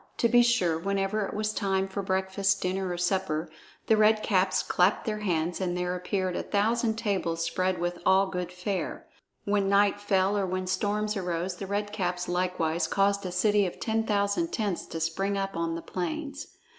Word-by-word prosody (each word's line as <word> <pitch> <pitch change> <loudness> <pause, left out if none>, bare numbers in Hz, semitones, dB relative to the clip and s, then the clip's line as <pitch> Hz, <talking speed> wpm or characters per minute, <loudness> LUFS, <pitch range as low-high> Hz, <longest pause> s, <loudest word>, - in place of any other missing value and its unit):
To 235 - +3
be 240 +1 +6
sure, 225 -10 +2
whenever 195 +2 -1
it - - -7
was 215 0 -1
time 195 -3 0
for 195 +1 -4
breakfast, 190 +1 0
dinner, 185 +1 -1
or 175 - -3
supper, 175 -3 -1 0.3
the 220 - +4
Red 215 0 +4
Caps 190 -2 +2
clapped 180 +3 +2
their 215 -1 -2
hands 175 -3 -1
and 180 -1 -1
there 180 0 -1
appeared 185 0 -2
a - - -1
thousand 220 +2 +1
tables 185 -7 -1
spread 185 +2 0
with 175 0 -2
all 190 +1 +5
good 180 -2 -4
fare. 180 -1 -3 0.4
When 200 -1 +1
night 200 0 +3
fell, 195 0 +2
or 200 -2 0
when 185 0 -2
storms 210 +3 -1
arose, 180 -1 -2
the 195 - -6
Red 205 +1 -2
Caps 180 -2 -2
likewise 175 -2 0
caused 200 -1 +1
a - - -5
city 205 +2 +3
of 175 - -8
ten 225 0 0
thousand 210 +10 0
tents 205 -6 -2
to 165 - -5
spring 195 +5 -1
up 195 0 -2
on 165 0 -1
the 165 - -6
plains. 280 - -4
195 Hz, 190 wpm, -28 LUFS, 180-205 Hz, 0.4 s, be